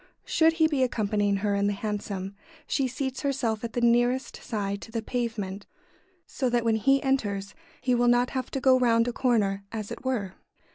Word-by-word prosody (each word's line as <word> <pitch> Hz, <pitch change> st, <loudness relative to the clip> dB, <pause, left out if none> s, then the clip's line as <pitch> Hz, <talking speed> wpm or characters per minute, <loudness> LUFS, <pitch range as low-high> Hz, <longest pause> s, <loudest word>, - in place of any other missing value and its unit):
] -, -, -45 dB
Should 320 Hz, 0 st, +3 dB
he 325 Hz, -1 st, +3 dB
be 290 Hz, -4 st, 0 dB
accompanying 205 Hz, -4 st, +1 dB
her 205 Hz, -, +2 dB
in 200 Hz, 0 st, +1 dB
the 205 Hz, -, +1 dB
hansom, 200 Hz, -2 st, -4 dB, 0.3 s
she 270 Hz, -2 st, 0 dB
seats 260 Hz, +1 st, -4 dB
herself 245 Hz, -6 st, -1 dB
at 230 Hz, -, -4 dB
the 240 Hz, -, -1 dB
nearest 240 Hz, +2 st, +2 dB
side 200 Hz, -3 st, -3 dB
to 225 Hz, -, -10 dB
the 225 Hz, -1 st, -3 dB
pavement, 215 Hz, -5 st, -3 dB, 0.6 s
so 255 Hz, -, -2 dB
that 240 Hz, -1 st, +1 dB
when 225 Hz, -1 st, +3 dB
he 270 Hz, +4 st, +3 dB
enters 205 Hz, -8 st, -1 dB, 0.3 s
he 250 Hz, 0 st, +1 dB
will 245 Hz, 0 st, +3 dB
not 245 Hz, +1 st, +3 dB
have 260 Hz, -2 st, -3 dB
to 270 Hz, -, -3 dB
go 260 Hz, 0 st, +5 dB
round 230 Hz, -1 st, +3 dB
a 245 Hz, -, -1 dB
corner, 205 Hz, -7 st, +1 dB
as 215 Hz, -2 st, -5 dB
it -, -, -7 dB
were. 225 Hz, -8 st, -2 dB
235 Hz, 200 wpm, -27 LUFS, 205-255 Hz, 0.6 s, go